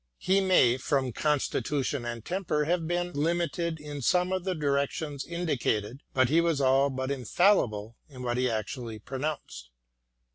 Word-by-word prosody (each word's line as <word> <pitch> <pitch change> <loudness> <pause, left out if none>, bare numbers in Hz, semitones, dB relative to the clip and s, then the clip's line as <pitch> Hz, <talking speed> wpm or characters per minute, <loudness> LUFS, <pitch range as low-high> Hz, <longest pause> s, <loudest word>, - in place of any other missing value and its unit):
He 195 +1 +2
may 155 -10 +4
from 130 -1 0
constitution 145 -2 0
and 115 -2 -5
temper 175 -5 -1
have 165 0 0
been 175 +1 -1
limited 170 +1 -1
in 145 -1 -7
some 180 +7 +2
of 185 -1 -1
the 185 -1 0
directions 140 0 -1
indicated, 135 -8 -2
but 130 -1 +3
he 160 +6 +4
was 165 -4 +1
all 135 +1 +4
but 130 0 -3
infallible 125 - +1
in 130 -3 -9
what 120 0 -1
he 125 0 +2
actually 115 +1 -4
pronounced. 130 - -5
140 Hz, 150 wpm, -28 LUFS, 125-170 Hz, -, may